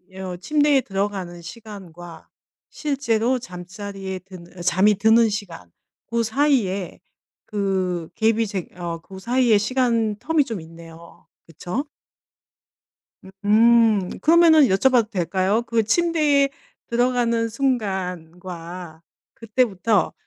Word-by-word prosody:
어 185 Hz, -2 st, -6 dB
침대에 290 Hz, +6 st, +2 dB
들어가는 195 Hz, -4 st, -4 dB
시간과 175 Hz, -5 st, -11 dB, 0.4 s
실제로 260 Hz, -4 st, 0 dB
잠자리에 190 Hz, 0 st, -7 dB
드는 180 Hz, -1 st, -14 dB
어 -, -, -6 dB
잠이 185 Hz, +4 st, +3 dB
드는 220 Hz, +3 st, +4 dB
시간. 180 Hz, -, -6 dB, 0.4 s
고 235 Hz, 0 st, 0 dB
사이에 220 Hz, -7 st, 0 dB, 0.5 s
그 185 Hz, -5 st, -2 dB
갭이 225 Hz, 0 st, +1 dB
제 190 Hz, -4 st, -4 dB
어 170 Hz, -1 st, -4 dB
고 190 Hz, +3 st, -12 dB
사이에 240 Hz, +1 st, +2 dB
시간 230 Hz, -2 st, 0 dB
term이 320 Hz, -3 st, +1 dB
좀 225 Hz, -7 st, -5 dB
있네요. 165 Hz, +1 st, -14 dB, 0.2 s
그쵸? 175 Hz, -, -5 dB, 1.6 s
음. 220 Hz, -2 st, +4 dB
그러면은 325 Hz, 0 st, +6 dB
여쭤봐도 230 Hz, +3 st, +3 dB
될까요? 190 Hz, +3 st, 0 dB
그 230 Hz, -1 st, 0 dB
침대에 295 Hz, +1 st, +2 dB, 0.4 s
들어가는 235 Hz, -1 st, +1 dB
순간과 180 Hz, -, -4 dB, 0.3 s
그때부터 225 Hz, -3 st, 0 dB
210 Hz, 235 characters per minute, -22 LUFS, 180-235 Hz, 1.6 s, 그러면은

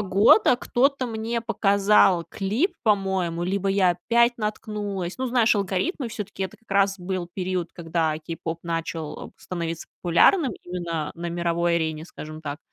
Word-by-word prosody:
года 205 Hz, +5 st, +5 dB
кто-то 260 Hz, +1 st, +1 dB
мне 230 Hz, +1 st, -3 dB
показал 200 Hz, -4 st, +3 dB
клип, 215 Hz, -, -1 dB
по-моему, 190 Hz, -5 st, +1 dB
либо 195 Hz, +2 st, -1 dB
я 195 Hz, -2 st, +4 dB
опять 235 Hz, +7 st, +2 dB
наткнулась. 210 Hz, -3 st, -4 dB
Ну, 260 Hz, -, -1 dB
знаешь, 240 Hz, -2 st, +3 dB
алгоритмы 205 Hz, -, -1 dB
всё-таки. 205 Hz, -3 st, -5 dB
Это 190 Hz, -, -7 dB
как 230 Hz, -, -32 dB
раз 195 Hz, 0 st, +2 dB
был 180 Hz, -1 st, -4 dB
период, 185 Hz, -2 st, -2 dB
когда 165 Hz, -2 st, -1 dB
k-pop 165 Hz, +1 st, -5 dB
начал, 165 Hz, -2 st, -4 dB
э, -, -, -18 dB
становиться 170 Hz, -2 st, -5 dB, 0.2 s
популярным 240 Hz, -, +4 dB
именно 170 Hz, -3 st, -3 dB
на 170 Hz, +1 st, -5 dB
мировой 170 Hz, 0 st, 0 dB
арене, 160 Hz, -1 st, -2 dB
скажем 155 Hz, -1 st, -9 dB
так, 145 Hz, -1 st, -5 dB
190 Hz, 145 wpm, -24 LUFS, 170-215 Hz, 0.2 s, года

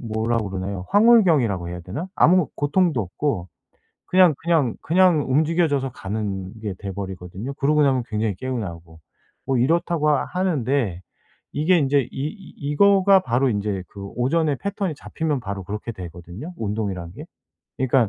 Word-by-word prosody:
뭐라 115 Hz, +1 st, -1 dB
그러나요? 95 Hz, -2 st, -4 dB
황홀경이라고 165 Hz, -, +4 dB
해야 90 Hz, 0 st, -6 dB
되나? 105 Hz, -, -6 dB
아무 180 Hz, 0 st, +4 dB
고통도 150 Hz, -1 st, +1 dB
없고 95 Hz, 0 st, -3 dB, 0.6 s
그냥, 180 Hz, -4 st, +5 dB
그냥, 160 Hz, -8 st, +1 dB
그냥 175 Hz, -3 st, +3 dB
움직여져서 150 Hz, -2 st, +1 dB
가는 95 Hz, -3 st, -4 dB
게 105 Hz, -3 st, -3 dB
돼 100 Hz, -2 st, -5 dB
버리거든요 95 Hz, +5 st, -6 dB
그러고 150 Hz, +3 st, +2 dB
나면 130 Hz, -3 st, +2 dB
굉장히 105 Hz, -3 st, -1 dB
개운하고. 85 Hz, -9 st, -6 dB, 0.5 s
뭐 135 Hz, -2 st, +1 dB
이렇다고 160 Hz, +3 st, +2 dB
하는데 140 Hz, -, 0 dB, 0.5 s
이게 160 Hz, +5 st, +3 dB
인제 140 Hz, -1 st, +3 dB
이 -, -, -10 dB
이 155 Hz, +9 st, -6 dB
이거가 195 Hz, +6 st, +4 dB
바로 130 Hz, -1 st, +1 dB
인제 100 Hz, -3 st, -2 dB
그 100 Hz, -1 st, -9 dB
오전의 145 Hz, +3 st, +1 dB
패턴이 200 Hz, -1 st, -3 dB
잡히면 150 Hz, 0 st, -3 dB
바로 100 Hz, -2 st, -5 dB
그렇게 105 Hz, +5 st, -5 dB
되거든요 90 Hz, -, -9 dB
운동이란 100 Hz, -5 st, -3 dB
게. -, -, -9 dB, 0.5 s
그러니깐 130 Hz, -3 st, +3 dB
130 Hz, 345 characters per minute, -23 LUFS, 100-160 Hz, 0.6 s, 그냥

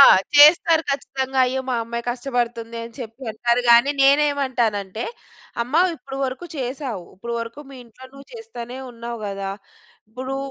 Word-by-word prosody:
ఆ! -, -, +12 dB, 0.3 s
చేస్తారు 320 Hz, +2 st, +7 dB
ఖచ్చితంగా. 270 Hz, -1 st, -2 dB
అయ్యో! 260 Hz, +1 st, -1 dB
మా 250 Hz, -, +1 dB
అమ్మాయి 235 Hz, +1 st, -5 dB
కష్టపడుతుంది 240 Hz, -2 st, -3 dB
అని 230 Hz, -, -10 dB
చెప్పి 230 Hz, +2 st, -9 dB
అంటారు 240 Hz, +2 st, +1 dB
గానీ, 235 Hz, +4 st, +7 dB
నేనేమంటానంటే, 260 Hz, -8 st, +2 dB, 0.6 s
అమ్మ 250 Hz, +5 st, -7 dB, 0.2 s
ఇప్పుడు 270 Hz, +1 st, -9 dB
వరుకు 265 Hz, +7 st, -5 dB
చేశావు. 255 Hz, -, -4 dB
ఇప్పుడు 235 Hz, +5 st, -5 dB
వరుకు 230 Hz, +6 st, -7 dB
మీ 270 Hz, -, -10 dB
ఇంట్లో 235 Hz, +3 st, -16 dB
నువ్వు 275 Hz, 0 st, -13 dB
చేస్తానే 260 Hz, -, -8 dB
ఉన్నావు 235 Hz, -1 st, -7 dB
గదా! 195 Hz, -1 st, -4 dB, 0.6 s
ఇప్పుడూ 260 Hz, +3 st, -5 dB
250 Hz, 145 wpm, -22 LUFS, 235-275 Hz, 0.6 s, ఆ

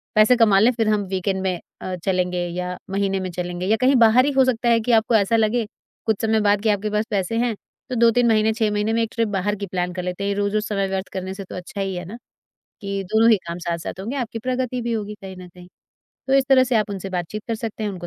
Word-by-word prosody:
पैसे 215 Hz, +4 st, +6 dB
कमा 210 Hz, -4 st, +5 dB
लें, 235 Hz, +4 st, +5 dB
फिर 225 Hz, -2 st, 0 dB
हम 210 Hz, -1 st, +1 dB
वीकेंड 190 Hz, +1 st, -1 dB
में 180 Hz, -2 st, -1 dB, 0.2 s
अ, 185 Hz, -1 st, -4 dB
चलेंगे 180 Hz, -1 st, 0 dB
या 180 Hz, +1 st, -4 dB
महीने 195 Hz, -1 st, 0 dB
में 185 Hz, -, -3 dB
चलेंगे 175 Hz, +1 st, -4 dB
या 220 Hz, +2 st, +3 dB
कहीं 265 Hz, +2 st, +4 dB
बाहर 235 Hz, +2 st, +6 dB
ही 290 Hz, -, +1 dB
हो 265 Hz, -1 st, +4 dB
सकता 240 Hz, -1 st, +1 dB
है 230 Hz, -, +4 dB
कि 245 Hz, -, -1 dB
आपको 225 Hz, +1 st, +3 dB
ऐसा 215 Hz, +1 st, +3 dB
लगे 225 Hz, +1 st, +1 dB, 0.4 s
कुछ 220 Hz, -2 st, +1 dB
समय 220 Hz, 0 st, +2 dB
बाद 205 Hz, 0 st, +3 dB
कि 220 Hz, -, +2 dB
आपके 210 Hz, +1 st, 0 dB
पास 210 Hz, +1 st, 0 dB
पैसे 200 Hz, +3 st, -1 dB
हैं, 240 Hz, -1 st, +1 dB, 0.4 s
तो 255 Hz, -, -3 dB
2-3 235 Hz, +1 st, +4 dB
महीने, 220 Hz, -1 st, +3 dB
6 220 Hz, -2 st, 0 dB
महीने 210 Hz, +2 st, 0 dB
में 230 Hz, -, +1 dB
एक 225 Hz, -, -3 dB
ट्रिप 230 Hz, -1 st, 0 dB
बाहर 205 Hz, +1 st, -1 dB
की 200 Hz, -, -5 dB
प्लान 180 Hz, -1 st, -2 dB
कर 180 Hz, -, -4 dB
लेते 180 Hz, +2 st, -4 dB
हैं। -, -, 0 dB
ये 200 Hz, -, -1 dB
रोज़-रोज़ 205 Hz, +1 st, 0 dB
समय 195 Hz, -2 st, -1 dB
व्यर्थ 190 Hz, 0 st, -3 dB
करने 190 Hz, 0 st, -4 dB
से 195 Hz, -, -7 dB
तो -, -, -9 dB
अच्छा 180 Hz, +2 st, -6 dB
ही 190 Hz, -1 st, -2 dB
है 175 Hz, -, -5 dB
ना, 210 Hz, +6 st, -8 dB, 0.6 s
कि 200 Hz, -1 st, -3 dB
दोनों 225 Hz, +1 st, +5 dB
ही 220 Hz, -, +6 dB
काम 170 Hz, +1 st, -4 dB
साथ-साथ 170 Hz, +2 st, -4 dB
होंगे, 230 Hz, +8 st, -4 dB
आपकी 235 Hz, -3 st, -3 dB
प्रगति 255 Hz, -1 st, -1 dB
भी 235 Hz, -, -2 dB
होगी 210 Hz, -2 st, -3 dB
कहीं 190 Hz, -1 st, -8 dB
न 180 Hz, -1 st, -10 dB
कहीं।" 180 Hz, 0 st, -15 dB, 0.6 s
तो 265 Hz, -, +1 dB
इस 270 Hz, -1 st, +4 dB
तरह 260 Hz, -1 st, +6 dB
से 250 Hz, -2 st, +1 dB
आप 215 Hz, -1 st, 0 dB
उनसे 195 Hz, -1 st, -5 dB
बातचीत 180 Hz, +4 st, -4 dB
कर 230 Hz, -, 0 dB
सकते 220 Hz, -1 st, -5 dB
हैं, 210 Hz, -, -1 dB
उनको 175 Hz, -3 st, -7 dB
210 Hz, 270 wpm, -22 LUFS, 190-230 Hz, 0.6 s, पैसे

